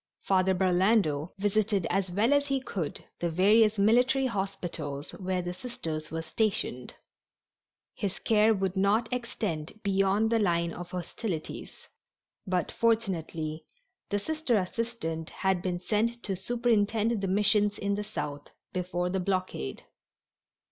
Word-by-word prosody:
Father 190 -1 +3
Burlando 180 -4 +2
visited 205 -1 +1
as 195 -1 +1
well 215 +9 +3
as 285 0 +3
he 275 -1 +1
could 185 - -4
the 170 - 0
various 210 +5 +4
military 245 +6 +4
hospitals 175 - -3
where 185 -1 -2
the 175 0 -3
Sisters 160 -8 -5
were 160 0 -3
stationed. 165 - -1 1.0
His 195 -2 -3
care 220 0 +4
would 190 -3 0
not 205 +5 +2
extend 215 -8 -3
beyond 200 +2 +2
the 230 - +3
line 170 -4 +1
of 175 0 -7
hostilities, 180 -1 -5 0.6
but, 180 -3 0
fortunately, 170 -9 -1 0.4
the 205 - +1
Sister 305 +1 0
assistant 185 -5 -3
had 190 -2 0
been 180 -1 -2
sent 230 +5 0
to 195 - -2
superintend 225 +1 +1
the 195 - -1
missions 205 +1 +2
in 200 0 -1
the 205 +1 -1
South 150 -9 -5 0.3
before 180 -1 -1
the 190 - 0
blockade. 185 - -2
195 Hz, 130 wpm, -29 LUFS, 175-220 Hz, 1.0 s, various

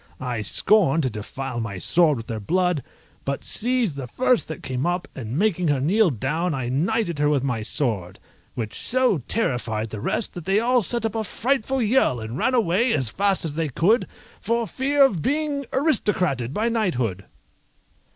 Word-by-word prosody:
I 125 -4 -3
scorned 165 - +3
to 130 - +1
defile 120 +4 -5
my 110 -4 -4
sword 155 - +3
with 115 - -7
their 115 -1 -4
blood, 180 - +1 0.4
but 140 0 -3
seized 240 - +1
the 130 -3 -5
first 250 - +1
that 160 - -7
came 130 +3 -2
up, 175 +1 -1
and 120 0 -5
making 180 -3 +1
her 145 -3 +2
kneel 185 +9 +3
down 155 - -1
I 125 -3 -3
knighted 170 - 0
her 145 0 +3
with 140 -3 +1
my 125 -5 -1
sword, 110 - -2 0.4
which 110 -3 -5
so 255 -8 +2
terrified 115 - -1
the 105 - -6
rest 220 - -1
that 175 -3 -8
they 195 +2 +3
all 245 +2 +3
set 235 +3 -1
up 220 - -1
a 225 - -1
frightful 265 +3 0
yell 215 - +2
and 110 +2 -6
ran 255 - +1
away 230 +2 +2
as 130 -6 0
fast 195 - 0
as 155 - -3
they 160 0 -1
could 200 - +2 0.3
for 235 0 0
fear 275 +4 +3
of 195 - 0
being 285 - -1
aristocrated 190 - +1
by 215 +9 0
knighthood. 125 - -1
170 Hz, 180 wpm, -23 LUFS, -, 0.4 s, scorned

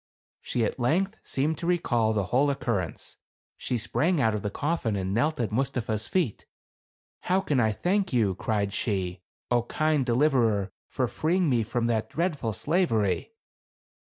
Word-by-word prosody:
She 120 -2 0
at - - -3
length 185 - +1
seemed 145 +3 -1
to 170 - -3
recall 120 -11 +2
the 105 -2 +1
whole 140 +3 +4
occurrence. 115 -10 -3 0.4
She 125 - -2
sprang 160 +9 +1
out 110 -5 +3
of 105 - -2
the 105 - -2
coffin 140 -2 -1
and 95 -1 -2
knelt 150 +8 +1
at 110 -4 -1
Mustapha's 115 -3 -1
feet. 170 - -1 0.7
"How 185 +2 +1
can 150 -9 0
I 110 -2 +3
thank 185 - 0
you," 110 -7 +2
cried 100 +1 -1
she, 95 -4 -2
" - - -6
0, 120 - +4
kind 155 -2 +1
deliverer, 120 -6 +2 0.2
for 130 - -1
freeing 160 +6 +1
me 120 -2 +3
from 115 +2 -1
that 115 -2 0
dreadful 155 -9 -1
slavery 115 - 0
120 Hz, 160 wpm, -27 LUFS, 110-155 Hz, 0.7 s, whole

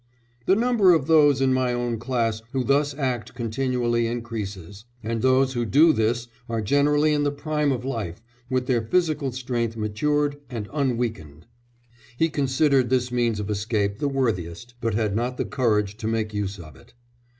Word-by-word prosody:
"The 190 - +5
number 220 -6 +4
of 155 - 0
those 145 -3 +5
in 130 -1 +3
my 130 -1 +1
own 120 -2 -2
class 115 -3 -1
who 130 -1 0
thus 140 +2 +1
act 125 -5 -3
continually 120 0 0
increases, 105 -4 -6 0.2
and 115 +1 -2
those 130 +1 +3
who 120 -2 -1
do 155 +8 +5
this 115 +1 0 0.2
are 115 -1 -1
generally 145 +7 +2
in 145 - +1
the 145 - +2
prime 150 0 -1
of 125 -1 -3
life, 110 -10 -4 0.3
with 130 -1 0
their 125 -3 +1
physical 150 +1 0
strength 120 -2 -3
matured 145 +7 0
and 115 -5 -5
unweakened." 115 - -2 0.7
He 165 +3 +2
considered 135 -3 +2
this 125 -1 +1
means 120 -3 0
of 105 0 -3
escape 100 -1 -1
the 145 - 0
worthiest, 115 -5 -2
but 115 -2 -1
had 105 -2 0
not 125 +3 -1
the - - -1
courage 105 -5 0
to 110 - -4
make 110 -1 -1
use 100 -1 -3
of 80 -5 -12
it. 65 - -20
120 Hz, 170 wpm, -24 LUFS, 110-140 Hz, 0.7 s, The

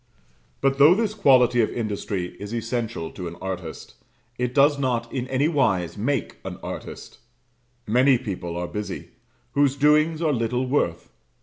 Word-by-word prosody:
But 135 0 +1
though 150 +5 +8
this 215 0 0
quality 130 - +4
of 110 - +1
industry 100 -5 -3
is 100 +3 -5
essential 115 -6 -3
to 90 -3 -6
an 85 - -7
artist, 90 -4 -6 0.5
it 125 -1 0
does 145 0 +4
not 120 -3 -1
in 130 -1 -2
anywise 130 - +1
make 120 +4 -2
an - - -6
artist; - - -8 0.7
many 125 +4 +4
people 90 -8 -5
are 90 0 -3
busy, 105 +2 -6 0.4
whose 140 +1 +2
doings 150 +3 +3
are 160 -3 +1
little 125 +1 0
worth. 105 - -1
125 Hz, 145 wpm, -24 LUFS, 105-140 Hz, 0.7 s, though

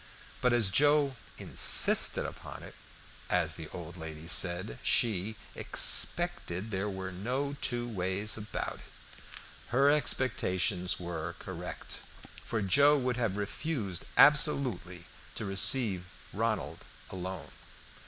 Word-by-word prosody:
But 125 - +2
as 115 -5 +2
Joe 145 +3 +2 0.2
"insisted - - +5
upon - - -10
it," - - -12 0.6
as 85 -3 0
the 80 -1 -9
old 85 +1 -10
lady 80 -1 -9
said, 85 -7 +1
she 110 -1 +1 0.2
"expected 110 - +2
there 100 +1 -3
were 95 -1 -7
no 130 +10 -4
two 120 -1 -2
ways 100 0 0
about 110 0 -6
it." - - -19 0.5
Her 135 +4 +2
expectations 100 -9 -1
were 85 -1 -6
correct, - - -8 0.4
for 110 -3 -4
Joe 140 +9 +4
would 125 -2 -3
have 110 -5 -2
refused 100 - -5
absolutely 135 - +2 0.3
to 110 - -5
receive 95 -1 +4 0.3
Ronald - - -3 0.3
alone. 95 -1 -8
100 Hz, 115 wpm, -29 LUFS, 90-130 Hz, 0.6 s, insisted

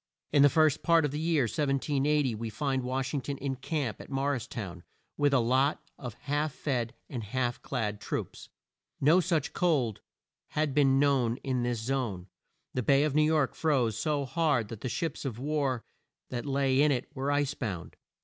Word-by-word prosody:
In 145 - +5
the 145 - +8
first 155 0 +3
part 165 -3 +4
of 145 - -1
the 150 - -3
year 160 -3 +2
1780 140 +1 +1
we 110 +1 -4
find 135 +4 -1
Wash 130 +2 -2
ing 140 - 0
ton 140 +2 -4
in 135 0 -2
camp 130 -3 -3
at - - -12
Mor 140 +1 0
ris 120 -4 -3
town, 90 -6 -6 0.3
with 145 -1 +2
a 135 - +4
lot 130 +5 +2 0.2
of 125 -5 -6
half 145 +1 -1
fed 120 -5 -2
and 120 -5 -5
half 120 +3 -2
clad 105 -6 -2
troops. - - -5 0.5
No 155 +6 +5
such 165 -5 0
cold 135 - +1 0.6
had 155 -2 +1
been 135 -2 +4
known 135 -4 +2
in 130 -2 0
this 120 -2 -1
zone. 110 -7 -2 0.4
The 130 - 0
Bay 135 +4 +4
of 150 -2 0
New 155 - +4
York 150 -3 +2
froze 130 -9 +1
so 145 +4 0
hard 140 -6 +1
that 110 - -8
the 130 - -2
ships 155 +7 -3
of 130 -6 -4
war 140 -3 -1 0.5
that 120 +3 -3
lay 135 -1 +2
in 150 0 +5
it 125 -3 -1
were 135 +2 -1
ice 145 -1 +1
bound. 95 - -5
135 Hz, 190 wpm, -29 LUFS, 120-145 Hz, 0.6 s, the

